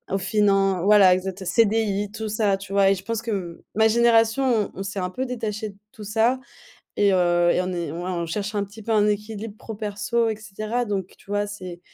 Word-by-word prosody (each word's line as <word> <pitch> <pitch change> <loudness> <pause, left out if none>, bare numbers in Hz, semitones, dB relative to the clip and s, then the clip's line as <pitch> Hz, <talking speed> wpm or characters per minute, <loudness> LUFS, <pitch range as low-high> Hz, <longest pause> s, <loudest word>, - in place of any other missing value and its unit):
au - - +2
finan 195 -2 +2
voila. 200 -3 +7
Exacte 190 +1 -5
heu, - - -9
CDI, 205 -2 +1
tout 220 0 -5
ça, 205 -2 +1
tu 195 0 -9
vois? 195 -1 +5
Et 195 - +3
je 190 - -9
pense 230 0 -3
que, 230 - -3
m 175 -4 -4 0.2
ma 220 +1 +5
génération, 230 0 +3
on - - -9
on - - -2
s'est 195 0 -4
un 180 0 -2
peu 260 +6 -3
détachés 220 -3 -4
de 195 - -15
tout 215 - -11
ça 225 +5 +1 0.6
et 200 -1 +3
heu, 175 -1 +3
et - - +1
on 185 - -3
est 170 -4 -3
ouais, 175 +3 -4
on 170 -1 -2
cherche 210 +5 -3
un 205 - 0
petit 205 +3 -13
peu 225 - -1
un 210 -1 +4
équilibre 210 +1 -4
pro 220 - -7
perso 215 +2 -1
et 220 - -2
cetera, 215 +3 -3
donc 195 -4 -3
tu - - -22
vois, 205 0 0
c'est 185 -4 -8
205 Hz, 235 wpm, -24 LUFS, 195-220 Hz, 0.6 s, voila